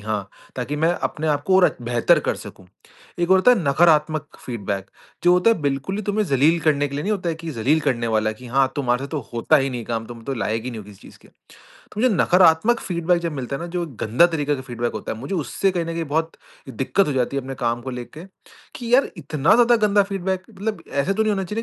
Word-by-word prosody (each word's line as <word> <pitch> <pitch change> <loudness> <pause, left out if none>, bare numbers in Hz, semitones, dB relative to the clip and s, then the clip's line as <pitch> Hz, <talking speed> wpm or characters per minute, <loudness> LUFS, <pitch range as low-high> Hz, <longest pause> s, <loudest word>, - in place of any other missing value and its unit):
हाँ, 105 -1 -3 0.3
ताकि 130 +4 -3
मैं 160 +3 +2 0.2
अपने 155 0 -5
आपको 150 +6 +2
और 185 - +4
बेहतर 120 0 +3
कर - - +2
सकूँ। 95 - -12 0.5
एक 175 +1 0
और 190 - +7
होता 185 +7 +5
है 245 - +2
नकारात्मक 155 +1 +3 0.2
फीडबैक 100 -5 -4 0.3
जो 175 - +6
होता 180 +5 +4
है 225 - 0
बिल्कुल 140 +7 -2
ही 210 - -3
तुम्हें 210 +1 0
ज़लील 150 +3 +3
करने 145 -2 +1
के 140 - -8
लिए 145 - -2
नहीं 210 +6 -1
होता 185 -4 -2
है - - -2
कि 165 0 -7
ज़लील 145 +5 +1
करने 120 -5 -1
वाला 110 -1 +1
है - - -7
कि 125 - -12
हाँ, 135 +2 +1
तुम्हारे 125 -2 0
से - - -7
तो 155 -1 -3
होता 120 +6 +3
ही 135 -1 0
नहीं 125 -2 -4
है - - -8
काम 115 -1 -3
तुम 115 -1 -10
तो 135 - -3
लायक 115 -1 -2
ही 125 - -4
नहीं 115 -3 -7
हो - - -12
किसी 100 -2 -14
चीज़ - - -15
के। - - -19 0.6
तो 210 - -4
मुझे 255 - +4
नकारात्मक 180 +6 +4
फीडबैक 175 -1 0
जब 170 - -2
मिलता 135 -1 -4
है - - -9
ना, - - -4
जो 175 0 -2 0.2
गंदा 120 +10 +4
तरीके 150 -4 -1
का 130 - -7
फीडबैक 120 -2 -3
होता - - -5
है, 110 - -7
मुझे 140 +10 -5
उससे 185 +4 0
कहीं 175 -2 -1
न - - -7
कहीं 165 0 -2
बहुत 160 +2 -1 0.4
दिक्कत 195 - 0
हो 145 - 0
जाती 130 +1 -1
है, 135 - -1
अपने 135 +1 -6
काम 120 -2 -1
को 130 - -5
लेके 125 +7 -8 0.5
कि 240 -1 0
यार 270 - +4
इतना 150 +1 +1
ज़्यादा 240 0 +5
गंदा 205 0 +4
फीडबैक 190 -1 -2
मतलब 205 -3 -4
ऐसा 140 +8 0
तो 220 +2 +1
नहीं 215 - +1
होना 195 -1 -1
चाहिए 210 +5 -4
150 Hz, 260 wpm, -22 LUFS, 125-180 Hz, 0.6 s, और